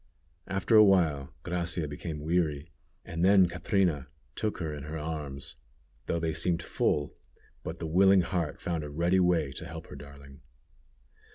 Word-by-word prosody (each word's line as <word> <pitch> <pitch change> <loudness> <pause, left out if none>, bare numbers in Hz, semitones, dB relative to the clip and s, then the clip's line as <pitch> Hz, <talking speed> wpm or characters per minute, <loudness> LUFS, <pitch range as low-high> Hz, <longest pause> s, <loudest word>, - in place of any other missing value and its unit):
After 95 +4 +1
awhile 85 -10 +5
Gracia 85 -2 -2
became 75 +1 -6
weary, 80 -3 -1 0.3
and 85 -1 -3
then 95 -1 +6
Catrina 85 - 0 0.3
took 110 - -2
her 80 -4 -3
in 75 -1 -7
her 75 +1 -5
arms, 75 -3 -6 0.5
though 85 - 0
they 80 -1 -1
seemed 85 0 0
full, 75 -3 0 0.5
but 80 - -6
the 85 - -5
willing 95 +4 +5
heart 85 -3 -2
found 85 -3 -2
a 75 - -6
ready 85 +5 +2
way 85 -6 +2
to 80 +6 -8
help 80 -1 -8
her - - -9
darling. 70 -1 -13
80 Hz, 155 wpm, -29 LUFS, 75-90 Hz, 0.5 s, then